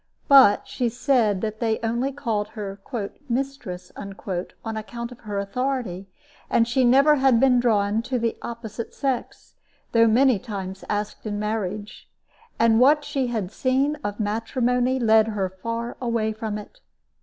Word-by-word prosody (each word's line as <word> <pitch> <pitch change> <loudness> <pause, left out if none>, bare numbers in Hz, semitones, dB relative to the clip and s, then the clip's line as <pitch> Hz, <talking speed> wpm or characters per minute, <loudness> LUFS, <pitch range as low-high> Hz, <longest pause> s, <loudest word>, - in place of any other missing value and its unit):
But 270 -8 +7
she 245 -2 -1
said 235 -5 +1
that 220 -1 -3
they 225 -2 +1
only 235 +4 0
called 230 -7 -2
her 200 -1 -6 0.5
"Mistress" 235 -8 -3
on 195 +2 -6
account 235 +2 -6
of 245 - -12
her 205 -2 -5
authority, 200 -2 -2 0.4
and 230 - +3
she 255 +2 +2
never 275 +5 +5
had 265 -3 +4
been 255 -1 +5
drawn 215 -2 +2
to 255 +2 -2
the 230 -1 -1
opposite 230 -1 -7
sex, 270 -3 -3 0.4
though 230 -1 +5
many 245 0 +4
times 195 -5 -6
asked 210 +1 -3
in 205 -1 -2
marriage. 210 -1 -4 0.5
And 225 0 +4
what 295 +4 +5
she 265 -3 -1
had 215 -6 -3
seen 270 +5 +1
of 205 +1 -4
matrimony 245 +4 0
led 220 -2 +4
her 200 -4 -1
far 230 +2 -4
away 230 -3 0
from 215 -1 -4
it. 210 - -11
230 Hz, 150 wpm, -24 LUFS, 210-250 Hz, 0.5 s, But